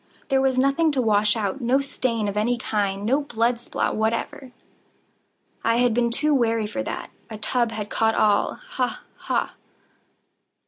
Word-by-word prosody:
There 270 -1 +3
was 265 -1 +1
nothing 275 +5 +3
to 270 - 0
wash 210 -2 +3
out—no 240 +5 0
stain 240 -5 -1
of 200 - -3
any 230 +4 +1
kind—no 210 +4 0
blood 240 -3 0
spot 240 - -2
whatever. 230 +4 -2 1.1
I 230 - +2
had 245 -1 +3
been 235 0 +2
too 300 +6 +1
wary 230 -4 +2
for 225 +6 -3
that. - - -5 0.2
A 220 - -6
tub 235 +2 0
had 215 -2 -6
caught 225 0 +2
all—ha! 355 - 0
ha! - - -2
235 Hz, 145 wpm, -24 LUFS, 215-265 Hz, 1.1 s, There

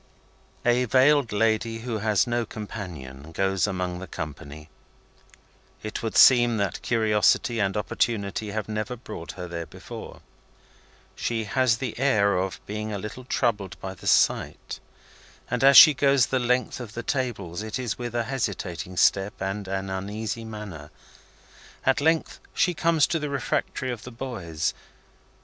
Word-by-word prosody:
A 120 +1 +3
veiled 135 +1 +4
lady, 115 +1 0
who 115 -2 -3
has 105 -1 +2
no 120 -1 0
companion, 85 -11 -8
goes 95 +1 +1
among 90 -2 -3
the 95 - -8
company. 75 -1 -7 1.2
It 110 - -4
would 110 -2 -2
seem 120 -3 +7
that 100 -3 -2
curiosity 110 +1 +2
and 95 -1 0
opportunity 105 -1 -1
have 105 -1 -3
never 110 +3 -3
brought 105 -9 -8
her 90 -1 -7
there 85 -1 -5
before. - - -10 0.9
She 115 -1 -2
has 125 +1 +2
the 120 -2 -5
air 105 -7 +3
of 95 +1 -2
being 105 +1 -4
a 105 - -2
little 105 +5 -7
troubled 105 -7 -1
by 95 0 -6
the 95 - -10
sight, - - +1 0.7
and, 125 +1 0
as 135 -1 +8
she 155 - +11
goes 140 -2 +3
the 130 - 0
length 125 +1 0
of 115 -4 -8
the 120 - -4
tables, 115 - -2
it 110 +2 -4
is 120 -5 -3
with 120 -1 -5
a 120 - +1
hesitating 95 -8 -4
step 95 +3 +3
and 95 +1 -3
an 95 0 -3
uneasy 105 +3 -4
manner. 105 -9 -8 1.0
At 135 +1 +3
length 160 +2 +1 0.2
she 180 - +2
comes 165 -1 +3
to 165 - -1
the 150 -1 -3
refectory 130 -1 -2
of 120 -3 -6
the - - -8
boys. 95 -11 -3
110 Hz, 155 wpm, -25 LUFS, 95-125 Hz, 1.2 s, she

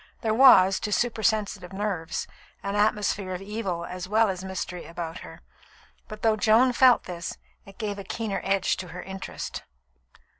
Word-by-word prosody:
There 220 -2 0
was, 195 -7 +7
to 210 - -4
supersensitive 215 -4 0
nerves, 190 -4 -3 0.4
an 200 0 -2
atmosphere 205 -2 +1
of 180 - -7
evil 195 -5 -3
as 180 +1 -6
well 220 +1 +3
as 185 -1 -4
mystery 185 -2 -5
about 165 0 -6
her; - - -11 0.7
but 215 0 -10
though 220 -1 +4
Joan 225 +4 +4
felt 250 0 +5
this, 175 0 -6 0.3
it 195 - -14
gave 205 -3 -4
a - - -6
keener 215 +1 -3
edge 195 0 +1
to 185 - -6
her 175 +2 -8
interest. 190 0 -6
200 Hz, 160 wpm, -26 LUFS, 185-215 Hz, 0.7 s, was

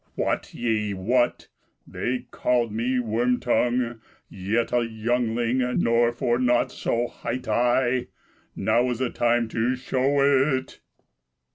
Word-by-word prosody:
Wot - - -2
ye 110 -4 -1
what? 120 +6 0 0.4
they 120 +9 -3
called 120 -3 0
me, 120 +4 0
Worm 120 +2 0
tongue, 120 -1 0 0.3
yet 110 +6 -1
a 120 -1 +3
youngling; 115 +2 -1 0.2
Nor 115 0 +3
for 120 0 0
nought 125 -1 +2
so 120 +1 -1
hight 125 +1 -5
I; 125 +1 +1 0.5
Now 120 +2 +1
is 120 -1 -3
time 120 0 +1
to 115 +3 0
show 135 +2 +2
it!" 130 - -9
120 Hz, 120 wpm, -24 LUFS, 115-125 Hz, 0.5 s, a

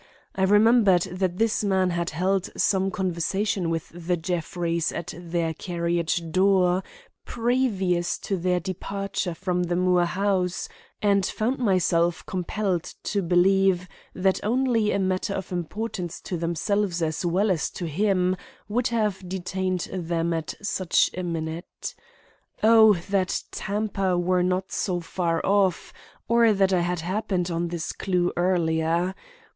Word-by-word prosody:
I 190 - -3
remembered 205 -3 +5
that 180 0 -2
this 225 0 +1
man 190 -2 +2
had 170 0 -1
held 185 +4 0
some 190 -1 +2
conversation 190 +1 -1
with 165 -1 -3
the 175 +1 -2
Jeffreys 170 0 -1
at 175 - -5
their 170 -1 -2
carriage 170 -1 -2
door 185 0 +3 0.4
previous 220 -8 0
to 200 - -2
their 180 0 +1
departure 190 0 -3
from 180 +1 -1
the 175 0 -1
Moore 180 -1 +3
house, 185 -1 0 0.4
and 200 -1 +3
found 235 +8 -1
myself 175 -6 +2
compelled 185 -1 -2
to 200 - -1
believe 185 +1 +3 0.3
that 190 +1 +1
only 235 -1 +2
a - - +1
matter 190 +1 -1
of 190 -1 -5
importance 180 0 -4
to 180 - -4
themselves 175 +2 -1
as 160 +1 -2
well 190 +4 +2
as 165 -5 0
to 175 - -6
him 185 +2 +1 0.3
would 235 +4 0
have 215 -5 0
detained 185 0 -2
them 170 -2 -1
at 160 -1 -3
such 190 -3 +2
a 185 - -3
minute. 165 -1 -5 0.7
Oh, 220 -1 +7 0.2
that 190 -3 +1
Tampa 195 -3 -1
were 180 +1 +2
not 180 +1 0
so 180 -3 -1
far 170 -1 -2
off 195 -3 +1 0.3
or 230 -1 +5
that 195 -1 +2
I 180 - +3
had 175 -1 -1
happened 185 -1 -1
on 170 +1 -1
this 170 -1 -4
clue 180 -2 0
earlier! 170 0 +1
185 Hz, 140 wpm, -25 LUFS, 175-195 Hz, 0.7 s, Oh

